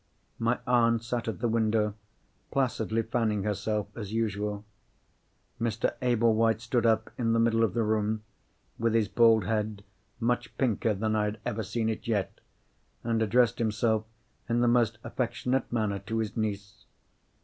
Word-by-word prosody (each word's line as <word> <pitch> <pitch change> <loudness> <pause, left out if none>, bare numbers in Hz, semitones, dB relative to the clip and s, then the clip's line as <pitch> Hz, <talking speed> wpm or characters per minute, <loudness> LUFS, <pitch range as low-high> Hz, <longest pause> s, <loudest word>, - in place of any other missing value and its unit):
My 115 +2 +1
aunt 115 -2 +3
sat 120 0 -3
at 105 -6 -4
the - - +2
window; 110 -2 +1 0.6
placidly 115 -5 0
fanning 110 -3 0
herself 105 +1 -1
as 105 -4 -6
usual. 105 -2 -2 1.0
Mr. 115 -1 0
Ablewhite 115 -2 +3
stood 115 +1 +1
up 110 -1 +1
in 115 -2 +2
the 115 - +3
middle 115 0 +3
of 105 -5 0
the 115 - +2
room, 110 0 0 0.6
with 115 0 +1
his 110 -2 +3
bald 115 0 +5
head 105 -1 -2 0.4
much 120 +1 -1
pinker 115 -4 +1
than 110 +2 0
I 105 -1 +2
had 105 0 -3
ever 115 -2 -2
seen 110 +2 -2
it 110 0 -3
yet, 105 -4 -1 0.6
and 115 -1 0
addressed 120 +2 +3
himself 110 0 +1 0.4
in 120 +1 +2
the 120 - +3
most 120 -2 +3
affectionate 125 +1 -1
manner 105 -4 0
to 115 - -4
his 110 -2 -2
niece. 105 -3 -4
110 Hz, 155 wpm, -28 LUFS, 105-115 Hz, 1.0 s, bald